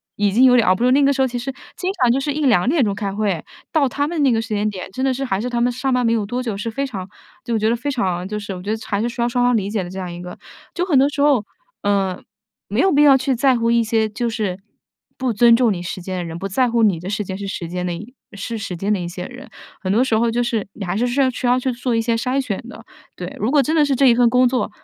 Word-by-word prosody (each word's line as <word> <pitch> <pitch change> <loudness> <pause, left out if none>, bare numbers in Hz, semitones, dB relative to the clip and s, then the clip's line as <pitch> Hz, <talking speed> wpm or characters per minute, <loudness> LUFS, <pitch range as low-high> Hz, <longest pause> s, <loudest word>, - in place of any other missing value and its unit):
已 205 -1 +1
经 235 +6 +4
有 255 -1 +7
点 235 -3 +4
熬 185 - +6
不 230 - -2
住。 250 - +4
那 280 +2 +4
个 280 +1 +4
时 270 - -1
候 265 - +3
其 245 -1 -4
实 255 +3 -4 0.2
经 370 +1 -1
常 245 -2 +5
就 265 - +2
是 290 +2 -2
1-2 260 -11 +2
点 290 0 +3
钟 200 -3 0
开 200 -2 -3
会， 200 -5 -1 0.3
到 290 -4 +3
他 285 +3 -1
们 330 -1 -2
那 270 - +4
个 225 -1 +1
时 225 - -8
间 210 0 0
点， 190 -3 -7
真 260 +6 -2
的 265 - +2
是 270 +2 -3
还 195 -7 -1
是 245 +4 -2
他 240 -1 -1
们 245 - +2
上 255 +2 -1
班 250 -1 +1
没 230 - +3
有 220 -3 0
多 245 +5 -3
久， 225 -5 -3
是 230 +3 -3
非 275 +5 -2
常 195 -8 -6 0.4
就 235 -1 -1
觉 215 +1 +2
得 235 - +2
非 250 +5 -3
常 185 -8 -1
就 210 +1 -4
是 200 -1 -6
我 180 - -8
觉 205 - -2
得 - - -7
还 200 -1 -1
是 235 - 0
需 240 0 -4
要 235 - +1
双 245 0 +1
方 245 0 +3
理 200 -3 -1
解 205 -2 -1
的 175 - -7
这 190 +1 -7
样 180 -2 -5
一 175 - -8
个。 180 0 -8 0.4
就 355 - -1
很 325 -7 +2
多 270 +2 +5
时 285 0 -3
候， 280 -7 +3 0.4
呃， 195 -2 0 0.5
没 210 +4 -2
有 380 +5 +4
必 290 0 +4
要 280 -2 +7
去 265 0 +1
在 260 +2 +3
乎 230 -1 0
一 235 0 +3
些 220 -1 +1
就 235 +3 -3
是 210 -5 -2 0.6
不 260 -2 -1
尊 230 +2 +5
重 235 -2 +3
你 180 -3 -3
时 180 +1 -5
间 185 +1 -5
的 180 - -2
人， 165 0 -6
不 195 - -3
在 245 +6 +1
乎 235 0 +2
你 195 -7 +3
的 180 - -8
时 210 +1 -2
间 190 0 -5
是 200 - -5
时 175 -3 -5
间 180 +1 -3
的 175 - -2 0.4
是 230 +3 -4
时 200 -4 -5
间 195 +5 -2
的 205 - +1
一 175 - -4
些 180 +1 -6
人。 255 +2 -11 0.3
很 190 - -3
多 235 +4 +4
时 230 -4 +1
候， 235 +1 +2
就 240 +1 0
是 230 -6 -2
你 205 - -7
还 180 +2 -2
是 245 +3 +1 0.2
需 250 - -5
要 245 +1 +4
去 260 +1 -1
做 245 0 -2
一 225 - +2
些 230 0 0
筛 255 +4 0
选 225 -5 -4
的。 230 -1 -11 0.3
对， 180 0 -7
如 215 +4 0
果 285 -1 +4
真 310 - -1
的 305 -2 +4
是 280 -1 +1
这 270 +1 +4
一 240 - +6
份 240 -1 +4
工 250 +2 +4
作 250 0 0
230 Hz, 340 characters per minute, -20 LUFS, 200-255 Hz, 0.6 s, 有